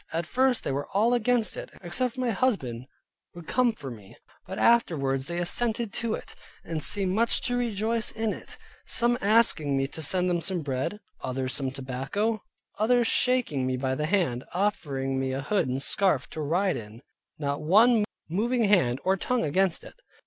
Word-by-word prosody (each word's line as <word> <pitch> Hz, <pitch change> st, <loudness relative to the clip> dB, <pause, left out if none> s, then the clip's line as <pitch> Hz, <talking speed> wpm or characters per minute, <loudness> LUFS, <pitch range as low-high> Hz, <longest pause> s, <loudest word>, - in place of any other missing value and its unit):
At 165 Hz, +1 st, -2 dB
first 255 Hz, +6 st, +1 dB
they -, -, -2 dB
were 140 Hz, +2 st, -3 dB
all 225 Hz, +4 st, +3 dB
against 240 Hz, -1 st, +2 dB
it, -, -, -7 dB
except 240 Hz, +8 st, -3 dB
my 250 Hz, -2 st, 0 dB
husband 135 Hz, -, -1 dB, 0.5 s
would 175 Hz, -1 st, -10 dB
come 250 Hz, +4 st, +2 dB
for 140 Hz, -, -8 dB
me, 105 Hz, -5 st, -12 dB, 0.3 s
but -, -, -6 dB
afterwards 140 Hz, -, +2 dB
they 170 Hz, 0 st, -4 dB
assented 220 Hz, +5 st, +1 dB
to 230 Hz, -2 st, -1 dB
it, -, -, -11 dB, 0.3 s
and 160 Hz, -3 st, -3 dB
seemed 195 Hz, -2 st, +6 dB
much 230 Hz, +3 st, +2 dB
to 245 Hz, -, -1 dB
rejoice 225 Hz, -1 st, -1 dB
in 220 Hz, -1 st, -2 dB
it; -, -, -11 dB, 0.3 s
some 240 Hz, 0 st, +1 dB
asked 220 Hz, -1 st, +4 dB
me 135 Hz, -2 st, -1 dB
to 160 Hz, -, -8 dB
send 180 Hz, +4 st, +3 dB
them 175 Hz, -1 st, 0 dB
some 180 Hz, -1 st, -1 dB
bread, 135 Hz, +9 st, -3 dB, 0.2 s
others 130 Hz, 0 st, -2 dB
some 135 Hz, -2 st, +1 dB
tobacco, 135 Hz, -, -3 dB, 0.4 s
others 240 Hz, +2 st, +3 dB
shaking 225 Hz, -, +1 dB
me 130 Hz, 0 st, -1 dB
by 130 Hz, 0 st, -1 dB
the 150 Hz, +3 st, -2 dB
hand, 160 Hz, -10 st, 0 dB
offering 140 Hz, -9 st, -1 dB
me 130 Hz, 0 st, -2 dB
a 135 Hz, -, -2 dB
hood 200 Hz, +5 st, 0 dB
and 130 Hz, +2 st, -2 dB
scarfe 185 Hz, -8 st, +2 dB
to 155 Hz, -, -5 dB
ride 180 Hz, +6 st, 0 dB
in; 110 Hz, +3 st, -10 dB, 0.3 s
not 140 Hz, 0 st, -2 dB
one 215 Hz, +8 st, +5 dB, 0.2 s
moving 230 Hz, +8 st, 0 dB
hand 175 Hz, -, +3 dB
or 190 Hz, +1 st, +2 dB
tongue 250 Hz, +6 st, -1 dB
against 185 Hz, +4 st, +1 dB
it. -, -, -12 dB
180 Hz, 180 wpm, -27 LUFS, 135-225 Hz, 0.5 s, seemed